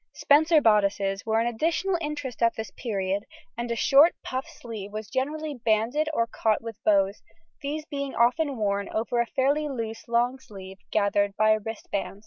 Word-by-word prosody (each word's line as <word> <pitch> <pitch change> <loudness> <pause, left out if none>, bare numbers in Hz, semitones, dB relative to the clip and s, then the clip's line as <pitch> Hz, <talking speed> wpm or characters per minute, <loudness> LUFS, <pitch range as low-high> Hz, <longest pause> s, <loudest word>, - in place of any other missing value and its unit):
Spencer 310 +2 +4
bodices 200 -2 +2
were 220 0 +2
an 230 - +1
additional 325 +10 0
interest 295 -6 -5
at 230 0 +3
this 220 -3 -6
period, 200 -3 -2 0.3
and 235 +1 -4
a 235 - -1
short 280 +8 +5
puff 260 +1 -4
sleeve 215 -4 -8
was 215 0 -7
generally 295 +4 -2
banded 240 +5 +1
or 230 -7 +1
caught 220 -1 0
with 225 -1 -9
bows; 200 -1 +2 0.4
these 300 +2 -4
being 280 -3 -5
often 265 +4 +2
worn 200 -2 -1
over 235 +2 -1
a 235 - -2
fairly 285 +4 +1
loose 225 -4 -5
long 240 +2 +1
sleeve 195 -5 -11
gathered 205 -1 +1
by 215 0 +4
a 215 - +3
wristband. 205 -2 -5
230 Hz, 170 wpm, -26 LUFS, 210-280 Hz, 0.4 s, short